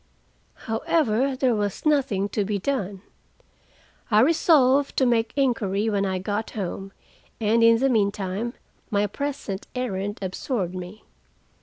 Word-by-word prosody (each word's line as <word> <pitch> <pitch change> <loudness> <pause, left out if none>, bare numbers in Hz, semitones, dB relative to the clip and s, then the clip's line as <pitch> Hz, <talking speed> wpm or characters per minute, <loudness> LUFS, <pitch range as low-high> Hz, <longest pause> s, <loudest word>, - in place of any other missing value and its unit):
However, 250 +2 +1
there 255 -2 +2
was 205 - -2
nothing 270 -10 +2
to 210 - -1
be 205 +1 -1
done. 200 -4 -3 1.1
I 215 -1 +5
resolved 285 -2 +4
to 265 - +4
make 230 -2 +2
inquiry 225 -6 +1
when 200 -1 +1
I 190 -1 -1
got 205 +4 -3
home, 195 0 -4 0.5
and 225 +1 +3
in 230 0 +6
the 270 +4 +2
meantime, 205 0 -1 0.3
my 205 -2 +1
present 225 -4 -4
errand 205 -5 -3
absorbed 190 0 -2
me. 185 +3 -8
220 Hz, 130 wpm, -24 LUFS, 200-255 Hz, 1.1 s, in